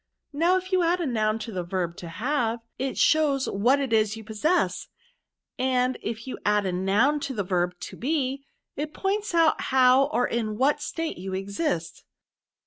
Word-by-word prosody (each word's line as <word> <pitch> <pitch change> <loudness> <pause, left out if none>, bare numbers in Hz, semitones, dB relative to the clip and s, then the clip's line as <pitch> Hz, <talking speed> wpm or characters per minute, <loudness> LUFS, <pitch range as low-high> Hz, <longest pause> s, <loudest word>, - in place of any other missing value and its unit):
Now, 340 +5 +3
if 370 +1 -6
you 370 -1 +3
add 345 +1 +2
a 345 - -1
noun 215 -4 0
to 230 - -7
the 185 -3 -3
verb 175 -1 -3
to 170 - -8
have, 230 - -1 0.2
it 265 0 -2
shows 290 -4 +3
what 245 +8 +2
it 270 -4 -2
is 215 -1 +2
you 220 - -9
possess; 220 - 0 0.7
and 255 0 +1
if 225 0 -5
you 260 - -6
add 210 0 +2
a 185 - 0
noun 200 +11 +2
to 270 -2 -4
the 205 - -1
verb 180 -1 0
to - - -7
be, 275 -1 -1 0.3
it 300 +2 -5
points 405 -1 -1
out 325 -2 +4
how 260 0 +5
or 245 -4 0
in 215 -3 -2
what 290 +4 +2
state 325 - -4
you 190 +1 -4
exist. 195 - -3
250 Hz, 185 wpm, -26 LUFS, 210-295 Hz, 0.7 s, how